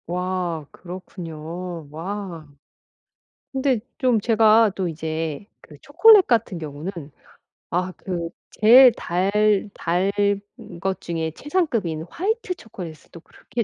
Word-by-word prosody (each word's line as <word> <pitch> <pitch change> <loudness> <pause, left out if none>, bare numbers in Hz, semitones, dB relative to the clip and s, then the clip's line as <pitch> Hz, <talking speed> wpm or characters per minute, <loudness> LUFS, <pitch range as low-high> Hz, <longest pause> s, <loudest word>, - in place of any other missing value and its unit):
와. 180 -2 -2
그렇군요. 175 -2 -8
와. 170 -1 -6 1.0
근데 265 -3 +1 0.2
좀 255 -6 +2
제가 220 0 +5
또 190 -2 -1
이제 160 +1 -4 0.2
그 - - -15
초콜릿 440 -4 +6
같은 225 -6 +1
경우는 155 +3 -6 0.8
아 180 +1 -1
그 175 -3 -4 0.2
제일 245 +4 +8
달 185 -1 -1 0.4
달 180 +4 0
단 205 -1 -3
것 190 +1 -1
중에 165 -1 -3
최상급인 230 - -1
화이트 415 - -2
초콜릿을 180 - -10
또 170 - -11
그렇게 235 +7 -5
185 Hz, 210 characters per minute, -23 LUFS, 165-225 Hz, 1.0 s, 제일